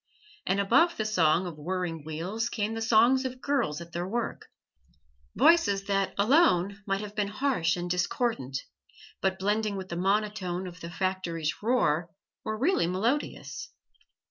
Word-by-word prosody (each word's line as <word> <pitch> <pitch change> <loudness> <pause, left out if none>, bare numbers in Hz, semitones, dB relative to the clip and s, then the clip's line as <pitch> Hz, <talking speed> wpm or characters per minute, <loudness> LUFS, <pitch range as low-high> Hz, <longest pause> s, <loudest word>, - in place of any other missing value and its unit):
And 195 +2 +2
above 275 - +3
the 215 - -1
song 175 -4 +3
of 165 -4 -7
whirring 170 -1 -3
wheels 180 +10 -3
came 215 -1 -2
the 225 - -4
songs 235 +4 +4
of 255 -1 -5
girls 250 - -1
at 170 0 -10
their 175 +2 -3
work 235 +4 -3 0.9
voices 265 -13 +4
that 195 -1 0
alone 200 - +3
might 195 0 0
have 210 -1 -7
been 205 -1 0
harsh 210 - 0
and 175 0 -3
discordant, 180 - -1 0.6
but 190 0 +1
blending 210 +2 0
with 190 -1 -6
the 170 - -4
monotone 195 -1 0
of 180 0 -9
the 170 - -7
factory's 175 -4 -2
roar 180 -8 +1 0.3
were 215 0 -3
really 275 - +2
melodious. 230 +11 -2
195 Hz, 150 wpm, -28 LUFS, 175-225 Hz, 0.9 s, songs